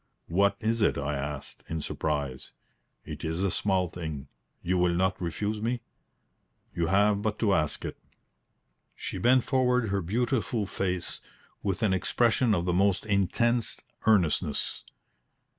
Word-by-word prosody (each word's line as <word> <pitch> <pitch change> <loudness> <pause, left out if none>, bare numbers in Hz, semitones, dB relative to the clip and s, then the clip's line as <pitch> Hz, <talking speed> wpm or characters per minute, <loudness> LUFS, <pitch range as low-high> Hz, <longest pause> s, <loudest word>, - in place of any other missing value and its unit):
"What 100 +4 +3
is 115 +1 0
it?" - - +3
I 70 +1 -1
asked, 70 0 -5
in 80 - -2
surprise. 70 -4 -3 0.5
"It - - -7
is 80 +3 -1
a 100 - +1
small 95 -2 +1
thing. 80 -5 -6 0.3
You 90 +1 +1
will 90 -1 +3
not 95 +2 +1
refuse 105 +6 -2
me?" 120 +2 -1 0.9
"You 85 -1 0
have 100 +2 +3
but 105 0 -1
to 105 -4 +2
ask 75 -4 0
it." - - -6 1.0
She - - -5
bent 125 +1 +4
forward 125 -4 +2
her 100 0 0
beautiful 115 +3 0
face 95 -2 -2 0.4
with 100 +2 -1
an 100 -3 +3
expression 115 +4 +2
of 85 -1 -1
the 90 - +1
most 100 +2 +2
intense 110 +4 +1 0.3
earnestness. 95 -8 +2
95 Hz, 140 wpm, -28 LUFS, 85-110 Hz, 1.0 s, bent